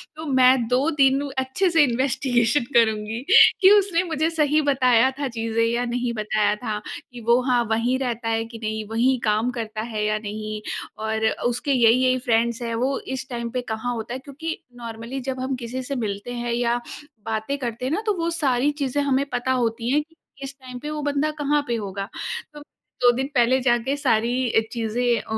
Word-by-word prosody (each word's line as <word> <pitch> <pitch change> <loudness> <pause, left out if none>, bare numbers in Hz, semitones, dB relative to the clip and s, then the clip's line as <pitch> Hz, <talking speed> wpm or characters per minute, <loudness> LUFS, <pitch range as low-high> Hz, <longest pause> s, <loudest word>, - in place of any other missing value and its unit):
तो 315 +1 -7
मैं 255 -2 +5
2 255 +6 +2
दिन 270 +1 +4 0.2
अच्छे 265 +9 +1
से 330 -3 +5
इन्वेस्टिगेशन 245 0 +1
करुँगी 220 -1 +2 0.4
कि 380 - +8
उसने 370 -3 0
मुझे 320 -2 0
सही 305 -2 +2
बताया 255 -1 +4
था 285 - -1
चीज़ें 225 0 0
या 235 +1 0
नहीं 240 0 -2
बताया 215 -1 +1
था, 210 -2 -4 0.3
कि 245 -1 -9
वो 235 +1 +5
हाँ, 245 -2 +3
वहीं 235 +3 +1
रहता 240 -3 -2
है 225 0 0
कि 230 0 -10
नहीं, 220 0 -2
वहीं 245 +3 +2
काम 215 +2 +1
करता 220 -3 -5
है 220 -2 -3
या 215 0 +1
नहीं 215 0 -5 0.4
और 220 0 -1 0.2
उसके 245 +4 0
यही-यही 255 +1 +4
फ्रेंड्स 235 0 +1
हैं? 230 -1 -3
वो 260 +4 0
इस 265 0 -6
टाइम 235 -2 -4
पे 255 - -2
कहाँ 220 +3 -2
होता 225 +1 -5
है? 260 - -4
क्योंकि, 300 +4 -6 0.2
नॉर्मली 235 +2 -6
जब 260 0 -4
हम 260 +1 -2
किसी 250 +1 -5
से 275 +2 -4
मिलते 215 0 -4
हैं 240 -1 -3
या 240 0 +1 0.5
बातें 225 +5 -2
करते 245 -2 -4
हैं 260 - -1
ना, 365 +7 0
तो 425 - +2
वो 335 0 -1
सारी 280 -5 +1
चीज़ें 275 +1 0
हमें 275 0 +1
पता 245 0 -1
होती 235 -1 0
हैं 295 +2 +3
कि 325 +2 -29 0.3
इस 275 0 -6
टाइम 255 -1 -9
पे 295 - -6
वो 305 0 -4
बंदा 290 +1 0
कहाँ 295 +1 +2
पे 240 - 0
होगा। 200 -2 -4 0.5
तो 295 - -10
2 245 -3 0
दिन 265 +2 -1
पहले 250 +1 +4
जाके 245 +2 +1
सारी 250 -2 +1
अ, - - +4
चीज़ें 235 +1 0
अ, - - -17
245 Hz, 200 wpm, -23 LUFS, 230-270 Hz, 0.5 s, कि